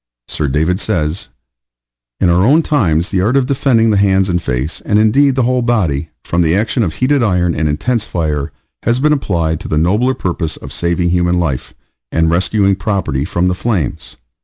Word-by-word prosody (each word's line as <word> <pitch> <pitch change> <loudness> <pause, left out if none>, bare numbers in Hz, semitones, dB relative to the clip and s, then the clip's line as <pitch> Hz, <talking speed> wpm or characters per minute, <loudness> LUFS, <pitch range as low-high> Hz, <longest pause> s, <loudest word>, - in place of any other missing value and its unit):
Sir 75 - -2
David 80 +7 0
says: 85 +3 -2 0.9
In 90 - +2
our 90 +2 +3
own 150 +9 +4
times 90 - +1
the 95 - +1
art 115 +8 +2
of 135 - +2
defending 125 -4 +2
the 105 - +2
hands 95 -1 +2
and 90 -1 0
face, 65 +2 -3
and 105 - 0
indeed 130 +6 +3
the 130 - +1
whole 125 +1 +1
body, 85 - 0
from 85 - 0
the 80 0 +2
action 110 +4 0
of 85 -8 -1
heated 140 +2 +1
iron 90 -6 +1
and 80 0 -1
intense 115 +10 -1
fire, 75 -6 -2 0.3
has 120 +1 0
been 150 +2 +3
applied 85 - -1
to - - -8
the 75 - -1
nobler 105 +11 +1
purpose 85 -3 -3
of - - -10
saving 85 0 0
human 90 0 +1
life, 70 -7 -3 0.4
and 80 0 +1
rescuing 95 +3 +2
property 85 -10 -2
from 85 +3 0
the 90 - +1
flames. 90 - -3
90 Hz, 190 wpm, -15 LUFS, 80-115 Hz, 0.9 s, own